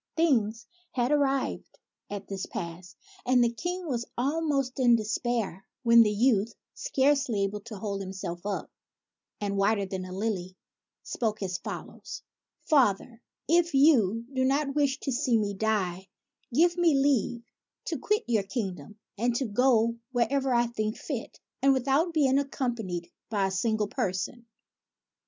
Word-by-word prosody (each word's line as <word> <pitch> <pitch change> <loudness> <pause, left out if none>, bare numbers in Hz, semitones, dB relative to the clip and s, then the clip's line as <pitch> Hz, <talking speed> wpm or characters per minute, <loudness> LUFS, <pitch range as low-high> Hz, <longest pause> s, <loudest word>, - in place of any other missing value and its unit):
Things 235 -8 +2 0.3
had 245 +1 +1
arrived 275 -2 0 0.3
at 200 -1 -6
this 195 -1 -4
pass, 175 +2 -7 0.3
and 250 -1 +4
the 235 0 +1
King 355 +7 -4
was 240 -4 -2
almost 275 -1 0
in 240 -2 +6
despair, 220 -3 -2 0.2
when 235 -1 +7
the 220 - +5
youth, 220 0 +2 0.2
scarcely 275 - +1
able 200 +1 -2
to 220 +1 -9
hold 200 0 -3
himself 185 -3 -6
up, 200 -1 -3 0.7
and 200 -1 -2
whiter 200 0 +2
than 190 -1 -4
a 185 - -9
lily, 185 -2 -3 0.5
spoke 215 -3 -2
as 185 -1 -2
follows: - - -7
— - - -64
" - - -51
Father, 235 -4 +3 0.3
if 335 -1 +3
you 235 -7 +4
do 260 -1 +1
not 275 +2 +1
wish 285 -1 +1
to 275 - -2
see 245 -2 +2
me 205 -2 -1
die, 190 -3 -1 0.4
give 340 +7 +3
me 340 -4 +4
leave 270 -4 +1 0.4
to 320 -5 -3
quit 420 +10 +1
your 230 -3 +2
kingdom, 195 - -5 0.2
and 240 +1 +1
to 265 - 0
go 230 0 +2
wherever 260 +2 +1
I 240 -1 +3
think 215 -2 -3
fit, - - -6 0.2
and 275 0 +5
with 260 0 -1
out 310 +6 +3
being 280 -4 +3
accompanied 235 -11 -3 0.2
by 205 -3 +1
a 190 - -1
single 215 +2 0
person." 225 +1 -3
235 Hz, 155 wpm, -28 LUFS, 200-270 Hz, 0.7 s, when